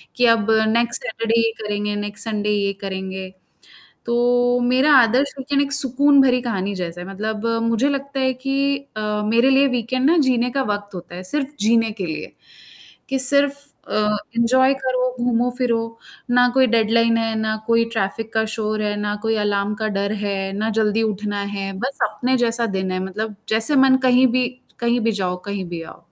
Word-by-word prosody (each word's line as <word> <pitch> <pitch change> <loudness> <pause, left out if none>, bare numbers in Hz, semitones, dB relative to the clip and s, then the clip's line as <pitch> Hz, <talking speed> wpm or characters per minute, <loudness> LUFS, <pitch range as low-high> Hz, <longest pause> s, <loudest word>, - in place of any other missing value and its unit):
कि 245 - +3
अब 225 -1 0 0.2
next 235 +1 +1
Saturday 230 +1 -1
ये 230 0 +2
करेंगे, 210 0 -2
नेक्स्ट 205 +1 -3
संडे 210 -2 -2
ये 200 -1 +1
करेंगे। 190 -1 -5 0.8
तो 245 +1 +2
मेरा 255 +5 +3
आदर्श 255 +3 +3
वीकेंड 280 +1 0
एक 280 0 -3
सुकून 280 +1 +3
भरी 250 -1 +3
कहानी 200 -4 -2
जैसा 175 -2 -5
है, 175 - -7
मतलब 215 +3 -4 0.2
मुझे 230 +4 +1
लगता 280 -1 -3
है 260 0 +2
कि 275 +2 0 0.2
अ, - - -3 0.3
मेरे 235 +4 +3
लिए 270 +1 +4
वीकेंड 255 +3 0
ना 345 - +4
जीने 245 0 +1
का 270 +2 -1
वक़्त 205 0 -8
होता 175 -1 -9
है, 180 - -7
सिर्फ 290 -2 -1
जीने 225 +1 +3
के 185 - -1
लिए, 160 -2 -6 0.8
कि 270 - -1
सिर्फ 280 +2 +3 0.2
अ, 210 0 +1 0.2
एंजॉय 260 +3 +3
करो, 255 -1 0 0.2
घूमो-फिरो, 245 0 0 0.5
ना 245 0 +4
कोई 265 -1 +5
डेडलाइन 230 +1 +3
है, 225 -1 -1
ना 220 0 -1
कोई 230 0 +3
ट्रैफिक 225 +1 -3
का 220 0 +2
शोर 215 -1 -2
है, 210 0 -1
ना 205 0 -2
कोई 225 0 0
अलार्म 200 0 0
का 215 0 -3
डर 200 +1 -1
है, 195 -1 -2
ना 215 +3 -2
जल्दी 215 +1 +1
उठना 210 -1 -2 0.2
है, 195 0 -4
बस 260 +6 -4
अपने 255 +1 0
जैसा 235 -1 +1
दिन 190 0 -2
है, 185 - -2
मतलब 210 +3 -5 0.2
जैसे 225 +7 +3
मन 260 -1 +5
कहीं 255 +1 +5
भी 250 -1 +2 0.3
कहीं 235 +1 +1
भी 225 0 +1
जाओ, 185 -3 -2
कहीं 200 -2 -3
भी 170 -1 -6
आओ। 165 - -12
230 Hz, 185 wpm, -20 LUFS, 205-255 Hz, 0.8 s, कोई